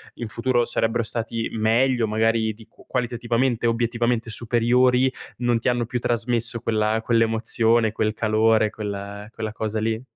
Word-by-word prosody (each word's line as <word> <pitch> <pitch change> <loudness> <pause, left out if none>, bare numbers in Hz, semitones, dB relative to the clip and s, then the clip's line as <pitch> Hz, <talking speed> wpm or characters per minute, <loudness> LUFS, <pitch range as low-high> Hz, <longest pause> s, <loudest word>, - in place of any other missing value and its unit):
in 120 - -5
futuro 120 +2 0
sarebbero 115 0 0
stati 115 0 -1
meglio, 115 +2 +2
magari 110 +1 +1
di 110 +1 -16
qu - - -21
qualitativamente 120 0 -1
e - - +4
obiettivamente 120 0 0
superiori, 125 +3 +2 0.3
non 120 -1 +1
ti 125 - 0
hanno 120 -1 0
più 120 +1 -3
trasmesso 115 0 -1
quella 110 -1 0
quell'emozione, 115 0 +2
quel 110 0 -1
calore, 110 0 +2
quella 100 -1 -6
quella 110 -1 -5
cosa 110 0 -3
lì? 110 +1 -1
115 Hz, 150 wpm, -23 LUFS, 110-120 Hz, 0.3 s, e